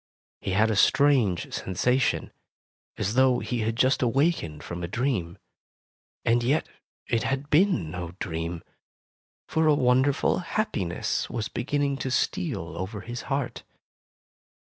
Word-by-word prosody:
He 95 - -3
had 110 +3 +3
a - - 0
strange 125 - +3
sensation, 125 +8 0 0.7
as 100 - -1
though 130 0 +4
he 125 0 -3
had 110 +1 -1
just 130 +2 +3
awakened 125 - +1
from 85 0 -6
a 85 - -3
dream. 100 -5 -1 0.9
And 120 +1 +3
yet 135 +6 +1 0.4
it 115 - 0
had 135 +4 -2
been 150 - +3
no 90 0 -5
dream, 85 -1 -4 0.8
for 160 0 +1
a 150 - +5
wonderful 130 +4 +2
happiness 165 - -2
was 115 -2 -3
beginning 140 +3 -1
to 135 - -3
steal 130 - -1
over 95 +3 -4
his 120 +1 -6
heart. 135 -2 -2
120 Hz, 130 wpm, -26 LUFS, 95-140 Hz, 0.9 s, a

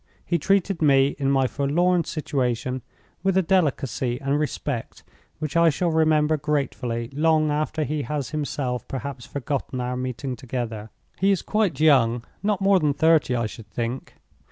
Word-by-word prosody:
He 170 - 0
treated 195 +1 +1
me, 135 -2 +5
in 135 -1 +1
my 135 -1 +3
forlorn 170 +7 +1
situation, 130 -4 -2 0.4
with 190 0 +1
a 190 - +4
delicacy 135 -8 0
and 140 +1 0
respect 145 -4 -4 0.3
which 155 -1 -4
I 170 0 +6
shall 170 +3 0
remember 155 -1 +3
gratefully 135 -5 -2
long 155 +1 +2
after 155 +1 -1
he 150 +1 -2
has 145 -1 -3
himself 140 -5 -3
perhaps 135 -2 -6
forgotten 135 -1 -3
our 125 0 -2
meeting 130 0 -4
altogether. 120 -4 -5 0.3
He 195 - +3
is 195 -3 +2
quite 210 -10 0
young—not 145 - +2
more 195 -1 +5
than 150 -4 +1
thirty, 160 -4 +3
I 115 -1 0
should 110 0 -8
think. 120 +4 -4
145 Hz, 155 wpm, -24 LUFS, 125-160 Hz, 0.4 s, I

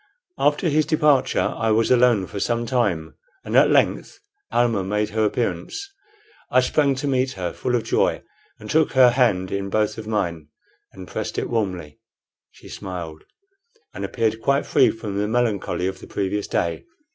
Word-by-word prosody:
After 145 +4 +2
his 155 0 +2
departure 150 -4 +2
I 115 - -1
was 110 +2 +2
alone 120 -5 +4
for 100 - -7
some 120 +3 -1
time, 105 -11 -1 0.3
and - - -3
at - - +6
length - - +1 0.3
Almah 115 -5 +1
made 105 +2 -1
her 110 +1 0
appearance. 115 - -2 0.6
I 130 - +4
sprang 140 +1 +1
to 135 +2 -3
meet 130 -1 0
her, 90 -2 -4
full 125 - -1
of 115 - 0
joy, - - 0 0.4
and 105 - -10
took 160 +5 +2
her 130 -2 +6
hand 110 -8 +1
in 100 0 -3
both 110 +1 0
of 110 - -8
mine 85 -8 -2 0.4
and 95 -1 -11
pressed - - -5
it - - -2
warmly. 90 -9 -3 0.5
She - - -17
smiled, 85 -5 -7 0.7
and - - -6
appeared 110 -1 -1
quite 140 +4 +1
free - - +4
from 105 -3 -4
the 105 - 0
melancholy 110 -5 -1
of 95 0 -3
the - - -12
previous 100 +1 -2
day. 85 -1 -2
110 Hz, 170 wpm, -22 LUFS, 95-125 Hz, 0.7 s, at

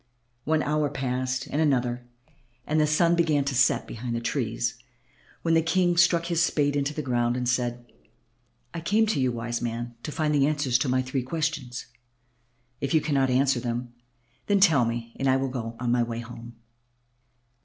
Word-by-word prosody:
One 155 0 +2
hour 150 0 0
passed 130 0 -2
and 150 - -2
another; 125 -4 0 0.6
the 155 0 +2
sun 165 +3 +3
began 155 -5 +2
to 140 - -1
set 130 +2 +3
behind 120 +1 -5
the - - -1
trees - - -2 0.6
when 165 - +2
the 165 - +5
King 175 +2 +2
stuck 170 -1 +4
his 170 -1 0
spade 145 -4 +1
into 140 0 0
the 150 0 -4
ground 120 -2 0
and 125 -1 -2
said, 120 -1 -1 0.9
"I 165 - -5
came 210 +7 +2
to 215 -8 0
you, 130 -1 +2
wise 120 0 -3
man, 120 0 -4
to 150 - -5
find 155 -1 0
the 140 -1 +3
answers 145 -5 +1
to 130 - 0
my 130 0 +2
three 130 +1 -2
questions. 140 -3 -3 0.9
If 140 +2 -1
you - - +6
cannot 140 -3 +1
answer 130 0 +2
them, 120 0 -4 0.5
then 205 -1 +3
tell 160 -11 +5
me 115 0 -4
and 135 - 0
I 130 - +4
will 135 0 -1
go 115 -3 -5
my 120 0 +1
way 115 0 -3
home." 120 0 -10
135 Hz, 180 wpm, -26 LUFS, 120-155 Hz, 0.9 s, you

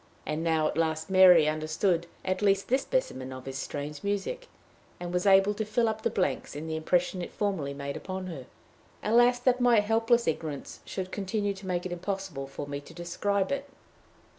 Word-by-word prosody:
And 155 +1 -2
now 160 -2 +2
at 155 - -2
last 160 +1 -1
Mary 180 -4 +8
understood 155 +3 0 0.2
at 185 +1 -1
least 195 -1 +2
this 260 +2 +3
specimen 130 - -2
of 130 -1 -8
his 135 0 -5
strange 145 +1 -5
music, 205 - -2 0.5
and 175 0 -5
was 180 +2 +1
able 195 +1 +6
to 220 - -2
fill 220 +2 +1
up 220 0 -2
the - - +1
blanks 185 - -1
in 150 +2 -5
the 160 0 -3
impression 180 +3 +1
it - - -6
formerly 170 -9 -2
made 140 0 -5
upon 190 0 -5
her. 150 -8 -7 0.6
Alas, 240 +3 +5
that 255 0 +2
my 240 -3 +6
helpless 225 +3 +2
ignorance 155 -3 -3
should 185 -1 -5
continue 205 0 -1
to 195 0 -10
make 180 -1 -1
it 185 - -4
impossible 180 -5 -4
for 140 - -6
me 140 0 -5
to 165 +3 -14
describe 190 +4 -1
it! 280 0 -3
185 Hz, 190 wpm, -28 LUFS, 155-205 Hz, 0.6 s, Mary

